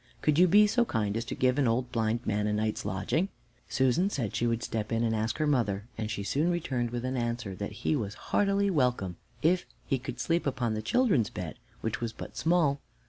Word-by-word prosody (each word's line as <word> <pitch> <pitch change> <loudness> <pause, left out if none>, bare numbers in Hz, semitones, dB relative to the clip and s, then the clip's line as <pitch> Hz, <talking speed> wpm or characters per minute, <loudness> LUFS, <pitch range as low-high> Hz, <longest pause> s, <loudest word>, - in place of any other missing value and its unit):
Could 150 +1 +3
you 180 - +7
be 205 +4 +7
so 235 +4 +3
kind 105 - -1
as 115 - -1
to - - -4
give 130 +2 +2
an 135 - +3
old 120 +2 0
blind 115 0 0
man 105 0 0
a 105 - 0
night's 110 0 -1
lodging?" 100 - 0 0.4
Susan 130 +9 +2
said 120 - -2
she 120 - +1
would 115 0 0
step 110 -1 -3
in 115 0 +1
and 115 -1 +1
ask 110 0 -1
her 155 - +1
mother, 110 -9 +1
and 110 -1 -3
she 105 -2 -3
soon 145 - +1
returned 130 -9 -1
with 120 +1 -3
an 130 +1 -1
answer 120 -4 -2
that 105 +4 -7
he - - +3
was 105 -7 -3 0.2
heartily 200 0 +3
welcome, 125 - +1 0.3
if 180 +3 +3 0.2
he 135 - 0
could 125 -1 -6
sleep 165 +3 +1
upon 125 -4 0
the 110 - -2
children's 165 - +2
bed, 85 -4 -6 0.2
which 110 +1 -2
was 115 -1 -2
but - - -9
small. 160 -5 +2
120 Hz, 225 wpm, -29 LUFS, 110-155 Hz, 0.4 s, you